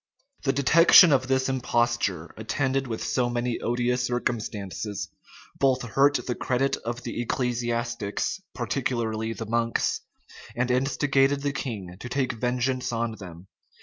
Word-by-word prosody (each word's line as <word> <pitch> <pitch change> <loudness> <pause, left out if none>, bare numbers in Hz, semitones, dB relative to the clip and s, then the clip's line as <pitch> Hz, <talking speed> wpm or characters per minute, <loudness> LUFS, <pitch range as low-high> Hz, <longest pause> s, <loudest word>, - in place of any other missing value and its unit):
} 275 0 -39
The 135 - +3
detection 160 +4 +7
of 130 -1 +2
this 130 0 +1
imposture, 120 -9 0
attended 135 +4 -1
with 110 -2 -4
so 125 -1 0
many 120 0 -1
odious 125 +1 0
circumstances, 105 -4 -3 0.5
both 130 -2 +2
hurt 135 +5 +3
the 125 - -1
credit 130 +3 0
of 120 +1 -5
the 120 0 -3
ecclesiastics, 120 -3 -2
particularly 110 -2 -2
the 115 - -6
monks, 115 +1 0 0.5
and 125 +1 0
instigated 135 +1 +2
the 145 -1 0
king 105 -10 -5
to 125 - -7
take 130 0 0
vengeance 125 +2 -1
on 115 0 -1
them. 90 -2 -10
120 Hz, 135 wpm, -26 LUFS, 115-130 Hz, 0.5 s, detection